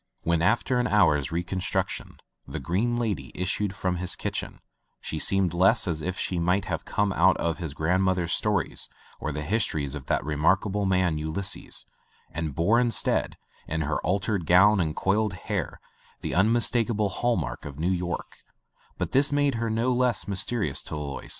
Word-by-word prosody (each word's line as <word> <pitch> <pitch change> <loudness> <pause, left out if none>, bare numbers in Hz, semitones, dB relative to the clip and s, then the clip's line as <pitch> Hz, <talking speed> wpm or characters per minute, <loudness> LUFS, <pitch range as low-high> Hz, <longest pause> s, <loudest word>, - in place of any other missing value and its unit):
When, 85 0 +1
after 120 +7 +2
an 125 - +1
hour's 75 - +3
reconstruction, 90 +2 -2 0.3
the - - -5
Green 110 +8 0
Lady 110 -6 -2
issued 95 +2 -1
from 90 -1 -1
his 90 0 -1
kitchen, - - -4 0.4
she 80 - -5
seemed 95 0 +2
less 95 +5 +4
as 80 -3 -2
if 90 +3 -3
she 90 - -1
might 90 +3 +1
have - - -4
come 100 -1 0
out - - +4
of - - -4
one 85 - +2
of 80 - -7
his 80 -5 -5
grandmother's 90 +1 +1
stories 105 -6 0 0.3
or 75 - -3
the 75 +1 -4
history 80 -4 0
of 70 -1 -6
that - - 0
remarkable 95 +7 +1
man, 90 -4 +1
Ulysses, 80 +6 -2 0.5
and 80 -4 -4
bore 105 +10 +3
in 125 -1 +2
stead, - - 0 0.3
in 80 +1 -2
her 75 0 -1
altered 95 0 -1
gown 100 +4 +6
and 80 -3 0
coiled 105 +1 +1
hair, 90 - -4 0.4
the - - -3
unmistakable 110 +1 +3
hall 120 +5 0
mark - - -4
of 70 -1 -8
New 85 +4 0
York, 90 -1 -3 0.6
but - - -3
this 140 +2 +4
made 145 -1 +2
her 115 - 0
no 115 +3 +1
less 125 -3 +2
mysterious 100 - 0
to - - -6
Alois. 70 -2 -6
95 Hz, 175 wpm, -26 LUFS, 80-105 Hz, 0.6 s, gown